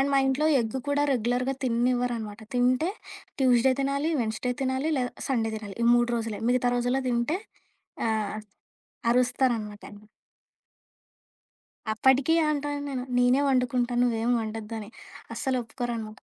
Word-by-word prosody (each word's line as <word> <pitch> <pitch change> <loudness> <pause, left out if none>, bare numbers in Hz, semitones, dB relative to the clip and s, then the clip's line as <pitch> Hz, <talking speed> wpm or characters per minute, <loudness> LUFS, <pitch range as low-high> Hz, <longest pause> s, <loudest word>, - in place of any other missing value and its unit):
And 280 +1 +2
మా - - +5
ఇంట్లో 270 +4 +1
egg 230 +3 -3
కూడా 285 0 +2
రెగ్యులర్‌గా 250 +2 0
తిన్నివ్వరనమాట. 240 -3 0
తింటే 255 +8 +2 0.5
ట్యూస్‌డే 255 0 +4
తినాలి, 280 +4 0
వెడ్నెస్‌డే 225 +3 -1
తినాలి 265 +4 0
లేదా 250 -1 -1 0.2
సండే 225 -4 0
తినాలి. 205 -3 -8
ఈ - - +3
3 240 0 +2
రోజులే. 225 -2 -3
మిగతా 245 0 +2
రోజుల్లో 245 +2 0
తింటే 240 +9 0 0.7
ఆహ్, 215 -1 -1 0.7
అరుస్తారన్నమాట. 245 -4 0 2.1
అప్పటికి 265 +6 +3 0.2
అంటా 290 -1 -1
ఉంటాను. 275 -3 -4
నేనే 250 +3 +4
వండుకుంటాను 250 -1 +1
నువ్వేమి 235 0 +1
ఒండొద్దుని. 220 -1 -6 0.5
అస్సలొప్పుకోరనమాట. 240 -4 -3
245 Hz, 115 wpm, -27 LUFS, 230-265 Hz, 2.1 s, మా